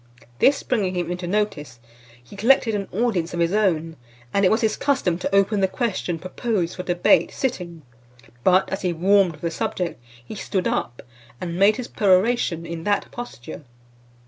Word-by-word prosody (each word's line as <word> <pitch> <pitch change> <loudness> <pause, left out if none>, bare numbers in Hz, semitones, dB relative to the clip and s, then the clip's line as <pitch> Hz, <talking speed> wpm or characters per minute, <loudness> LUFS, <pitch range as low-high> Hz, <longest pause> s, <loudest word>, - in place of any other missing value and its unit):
This 275 +1 +4
bringing 200 -7 -1
him 175 -1 -2
into 180 0 -4
notice, 175 - -2 0.4
he 120 - -14
collected 225 +2 +3
an 200 -2 -2
audience 185 -6 -1
of - - -3
his 170 +2 +1
own, 165 -6 +1 0.4
and 200 - +2
it 185 - +5
was 220 - +2
his 220 -2 +1
custom 225 -12 0
to 195 - -1
open 200 +1 +3
the 190 - +3
question 190 -5 -2
proposed 185 +1 -2
for - - -4
debate, 175 +10 +3
sitting; 175 - -4 0.6
but 185 +1 +4
as 195 - -3
he 180 -2 0
warmed 190 +1 +3
with 150 - -16
the 170 - -2
subject, 170 -4 -3 0.2
he - - -8
stood 195 -2 -2
up, 120 - -3 0.4
and 175 0 -4
made 205 +2 +5
his 250 - -5
peroration 190 -3 +2
in 165 -1 -6
that 205 +2 0
posture. 240 - -8
185 Hz, 175 wpm, -23 LUFS, 170-210 Hz, 0.6 s, it